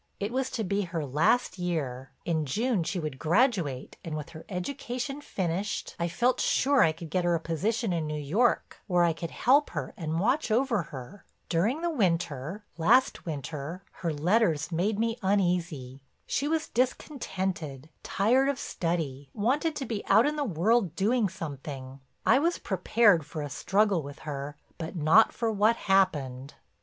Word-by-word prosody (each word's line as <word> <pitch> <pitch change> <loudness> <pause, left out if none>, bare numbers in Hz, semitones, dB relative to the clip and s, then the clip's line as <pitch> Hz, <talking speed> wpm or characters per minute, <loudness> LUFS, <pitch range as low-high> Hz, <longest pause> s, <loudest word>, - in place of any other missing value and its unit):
It 205 +2 -2
was 260 +1 -1
to 225 - -2
be 200 +1 0
her 170 -5 -3
last 160 - +2
year; 135 -8 -2 0.2
in 160 -2 0
June 225 - +1
she 180 +3 -2
would 150 -5 -5
graduate 170 - +1
and 155 -2 -4
with 150 +2 -6
her 160 -1 -11
education 250 +8 -4
finished, 190 - -3
I 170 - +1
felt 245 +8 +1
sure 275 0 +3
I 160 - +5
could 160 0 -9
get 185 0 +1
her 175 0 +2
a - - 0
position 195 +6 -1
in 160 -2 -1
New 150 0 -3
York 200 - +1
where 180 -3 +3
I 170 -1 +3
could 165 +1 -5
help 280 - +3
her - - -3
and 160 -1 -2
watch 250 - +1
over 230 -1 +2
her. 135 +7 -9 0.3
During 210 - +1
the 345 - +1
winter—last 175 - +1
winter—her 160 +4 -5
letters 165 +1 +1
made 195 +6 0
me 230 +1 0
uneasy. 175 -9 0 0.2
She 280 - -1
was 315 0 -1
discontented, 190 - -2
tired 255 +7 +2
of 280 - -1
study, 155 - -3
wanted 285 +9 +1
to 270 - -3
be 225 -4 -3
out 225 - +6
in 300 +1 0
the 295 - -1
world 200 - +1
doing 215 +2 +2
something. 135 -4 -7 0.3
I 250 +4 +5
was 340 +4 +1
prepared 190 -1 +3
for 150 +1 -6
a 145 - -6
struggle 195 +3 +2
with 145 0 -9
her, 145 -1 -5 0.2
but 165 +2 -5
not 165 +7 +5
for 230 -2 -1
what 215 +2 +3
happened. 145 - +1
180 Hz, 165 wpm, -28 LUFS, 155-230 Hz, 0.3 s, out